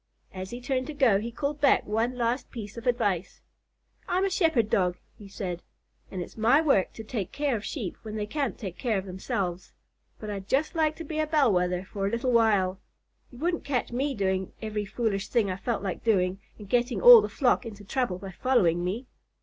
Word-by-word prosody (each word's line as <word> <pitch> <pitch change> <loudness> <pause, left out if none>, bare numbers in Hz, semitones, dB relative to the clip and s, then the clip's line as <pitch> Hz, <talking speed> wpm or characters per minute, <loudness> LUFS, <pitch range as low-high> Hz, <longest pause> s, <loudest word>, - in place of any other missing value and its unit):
As 185 0 -6
he 240 - -6
turned 255 +1 -2
to 305 - -6
go, 245 -9 +4
he 225 +3 -4
called 285 +4 -3
back 280 - +4
one 230 +4 -1
last 240 +2 -1
piece 215 -4 -8
of 235 +1 -7
advice. 205 -7 0 0.7
"I'm 370 +2 +1
a 390 - -1
Shepherd 320 - +2
Dog," 180 -4 +1 0.2
he 205 - -12
said, 185 -3 -5 0.5
"and 185 -2 -4
it's - - -13
my 230 +6 +4
work 275 - +2
to 225 - -8
take 210 -4 -4
care 285 -3 0
of 210 - -4
Sheep 220 - -4
when 215 -1 -7
they 210 -1 -2
can't 275 +3 -2
take 190 -6 -7
care 230 -5 0
of 190 - -3
themselves, 185 -1 -4 0.5
but 215 - -7
I'd 195 -1 -6
just 280 +6 +1
like 315 -2 +1
to 330 - -7
be 310 0 -4
a 310 - +1
Bell 290 -8 +3
Wether 180 0 0
for 195 0 -3
a - - +1
little 235 +4 -1
while. 205 -5 +3 0.5
You 245 - -13
wouldn't 340 +5 -1
catch 265 -4 -1
me 270 +3 -1
doing 190 -2 -1
every 215 -1 -3
foolish 200 -1 -2
thing 220 -6 +1
I - - -2
felt 225 +1 -2
like 190 -3 -4
doing 190 -4 +2 0.2
and 210 - -11
getting 245 +3 +1
all 485 -2 +10
the - - -3
flock 255 -3 +2
into 210 -4 -9
trouble 245 -4 -1
by 190 +1 -8
following 175 -8 +2
me! 205 +9 -3
225 Hz, 215 wpm, -27 LUFS, 195-265 Hz, 0.7 s, all